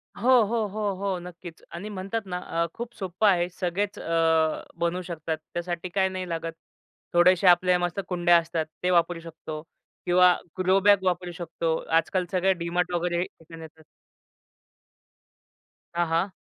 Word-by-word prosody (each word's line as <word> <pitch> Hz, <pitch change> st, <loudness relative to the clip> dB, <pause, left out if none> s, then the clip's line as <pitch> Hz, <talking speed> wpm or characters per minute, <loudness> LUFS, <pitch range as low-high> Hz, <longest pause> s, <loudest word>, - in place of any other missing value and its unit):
हो, 235 Hz, +6 st, 0 dB
हो, 220 Hz, +1 st, 0 dB
हो, 205 Hz, 0 st, -2 dB
हो. 195 Hz, -1 st, -2 dB
नक्कीच 175 Hz, -1 st, -10 dB
आणि 190 Hz, +5 st, -6 dB
म्हणतात 195 Hz, +3 st, -3 dB
ना 180 Hz, -1 st, -4 dB, 0.3 s
अ, -, -, +1 dB
खूप 240 Hz, 0 st, -7 dB
सोप्पं 190 Hz, +2 st, 0 dB
आहे. 175 Hz, -2 st, +2 dB
सगळेच 185 Hz, +3 st, -2 dB
अ, -, -, -8 dB, 0.7 s
बनवू 170 Hz, +2 st, 0 dB
शकतात, 165 Hz, -2 st, -4 dB, 0.2 s
त्यासाठी 175 Hz, +1 st, -3 dB
काय 190 Hz, +1 st, +1 dB
नाही 185 Hz, -1 st, -5 dB
लागत, 165 Hz, 0 st, -3 dB, 0.6 s
थोड्याशा 180 Hz, +2 st, +5 dB
आपल्या 180 Hz, 0 st, +3 dB
मस्त 175 Hz, +2 st, -2 dB
कुंड्या 175 Hz, -1 st, +4 dB
असतात 165 Hz, -1 st, -1 dB, 0.2 s
ते 180 Hz, -, +2 dB
वापरू 170 Hz, 0 st, +2 dB
शकतो 160 Hz, -2 st, -8 dB, 0.4 s
किंवा 180 Hz, 0 st, +6 dB, 0.3 s
ग्रो 185 Hz, +1 st, +4 dB
बॅग 200 Hz, -1 st, +5 dB
वापरू 180 Hz, -1 st, -1 dB
शकतो. 165 Hz, -1 st, -2 dB, 0.2 s
आजकाल 180 Hz, +2 st, 0 dB
सगळे 190 Hz, +1 st, +3 dB
डी 170 Hz, -1 st, -5 dB
मार्ट 180 Hz, +1 st, 0 dB
वगैरे 175 Hz, 0 st, 0 dB
तिथं 165 Hz, -2 st, -12 dB
येतात. 160 Hz, 0 st, -13 dB, 2.1 s
हां, 175 Hz, -1 st, +1 dB
हां. 165 Hz, +4 st, +1 dB
180 Hz, 155 wpm, -26 LUFS, 170-190 Hz, 2.1 s, किंवा